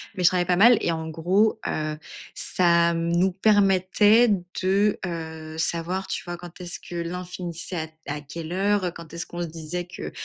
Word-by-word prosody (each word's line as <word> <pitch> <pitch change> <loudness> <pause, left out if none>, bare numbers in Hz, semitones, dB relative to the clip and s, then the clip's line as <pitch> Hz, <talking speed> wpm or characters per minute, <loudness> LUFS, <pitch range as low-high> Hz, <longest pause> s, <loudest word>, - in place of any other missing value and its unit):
mais 180 - -2
je - - +9
travaillais 180 -1 +1
pas 180 0 +2
mal 235 +3 +7
et 170 - +1
en 160 0 -3
gros, 185 +8 +2
heu, 155 0 -2 0.4
ça 170 -1 +3
mmh, 165 0 -1
nous 185 +2 +3
permettait 205 +3 +4 0.3
de, 200 +3 +2
heu, 160 -2 -6
savoir, 175 +3 -2
tu - - -3
vois? 175 0 -4
Quand 175 0 -11
est-ce 175 -1 -6
que 175 - -9
l'un 170 +2 -3
finissait 180 0 -6
à 160 0 -3
t 160 - -24
à 145 +1 -3
quelle 160 +3 -7
heure, 195 -1 +1
quand 165 -1 -11
est-ce 170 - -4
qu'on 175 0 -6
se - - -3
disait 165 +2 -5
que - - -7
175 Hz, 200 wpm, -25 LUFS, 165-190 Hz, 0.4 s, je